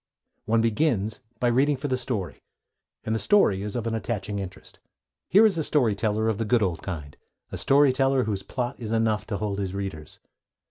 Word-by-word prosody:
One 115 +1 +2
begins 110 -2 0 0.2
by 120 - +2
reading 135 +4 +2
for 145 +3 -3
the 130 - +1
story, 115 - -4 0.6
and 110 - -2
the 110 - 0
story 105 - +3
is 105 0 -5
of 120 -2 -2
an 115 - -1
attaching 105 -2 -3
interest. 95 0 -9 0.5
Here 210 +5 +7
is 195 -6 +2
a - - 0
story 130 -8 +2
teller 110 +1 0
of 110 -1 0
the - - +1
good 115 0 +2
old 85 -5 -1
kind, 75 -6 -6 0.4
a - - -4
story 140 -1 +4
teller 135 0 +2
whose 105 -4 -2
plot 125 +6 -4
is 110 -3 -5
enough 110 -1 +1
to 105 - -2
hold 100 -1 -3
his 95 -1 -3
readers. 95 -6 -6
110 Hz, 200 wpm, -25 LUFS, 100-130 Hz, 0.6 s, Here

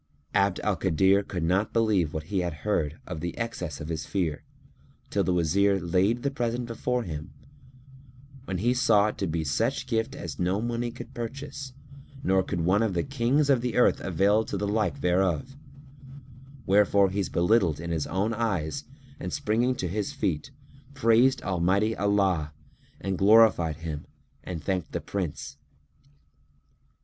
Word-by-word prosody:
Abd 100 -2 +2
al 105 -3 0
Kadir 95 +2 +3
could 90 -3 -4
not 95 +5 +1
believe 105 -9 +2
what 80 0 -4
he 95 +3 -1
heard 80 -2 -2
of 80 - -6
the 85 +1 -5
excess 90 -10 -4
of 75 - -6
his 80 -2 -3
fear, 85 -6 -1 0.7
till - - +1
the - - 0
Wazir 95 +4 +2
laid 95 +7 +1
the 140 - 0
present 120 -2 -2
before 120 +1 -2
him, 80 -1 -7 1.1
when 95 - -3
he 120 +7 +2
saw 115 -5 +4
it - - -8
to 95 - -1
be 80 0 -1
such 115 - 0
gift 115 +2 -1
as 150 - -7
no 90 +3 +1
money 120 +1 -2
could 120 - -10
purchase 135 +3 -6 0.5
nor 95 0 +3
could 90 -2 -3
one 95 +5 +3
of 110 -5 0
the 85 - +1
Kings 135 +2 +1
of 135 -4 +3
the 125 -2 -2
earth 125 - +4
avail 100 +4 +2
to - - -4
the 105 - -2
like 110 +6 0
thereof; 90 - +1 1.1
wherefore 100 0 +4
he 100 - -2
was 95 - -1
belittled 85 -4 +2
in 85 +1 -5
his 80 -3 -1
own 100 +6 0
eyes 105 - -2 0.3
and - - -5
springing 125 -2 +1
to 90 - -3
his 100 +3 -3
feet, 85 - -2 0.5
praised 125 +1 +3
Almighty 95 +4 +1
Allah 95 -7 +1 0.5
and 95 -2 -3
glorified 100 -6 +5
Him 80 -3 -6 0.4
and 85 -4 -6
thanked 95 -2 -2
the - - -1
Prince. 90 -7 -4
100 Hz, 160 wpm, -27 LUFS, 85-115 Hz, 1.1 s, glorified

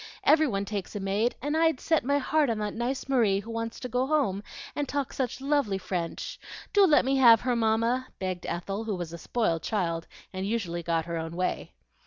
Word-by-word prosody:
Every 310 0 +5
one 200 -5 -1
takes 200 -2 -5
a - - -2
maid, 200 +5 0
and 295 +2 0
I'd 320 -4 +3
set 320 -2 +1
my 280 +3 +2
heart 290 0 +2
on 225 - 0
that 210 -1 -2
nice 250 +4 -2
Marie 225 -8 +3
who 220 +3 -8
wants 230 0 -4
to 250 - -3
go 250 +2 0
home, 270 -11 +1 0.3
and 290 -1 -2
talks 285 -2 -2
such 255 -1 -2
lovely 275 -8 +1
French. 175 -3 -4 0.3
Do 405 -2 +6
let 295 -5 +5
me 270 +1 +2
have 235 -4 +7
her, 250 -1 0
Mamma!" 230 +3 +1
begged 185 -2 -4
Ethel, 195 +5 -3
who 215 -3 -1
was 175 -2 -5
a 170 - -7
spoiled 170 -4 0
child 170 -6 -1 0.3
and 185 0 -3
usually 190 -6 -2
got 165 -1 0
her 170 -1 -3
own 160 +1 -5
way. 180 +1 -2
225 Hz, 215 wpm, -28 LUFS, 190-265 Hz, 0.3 s, have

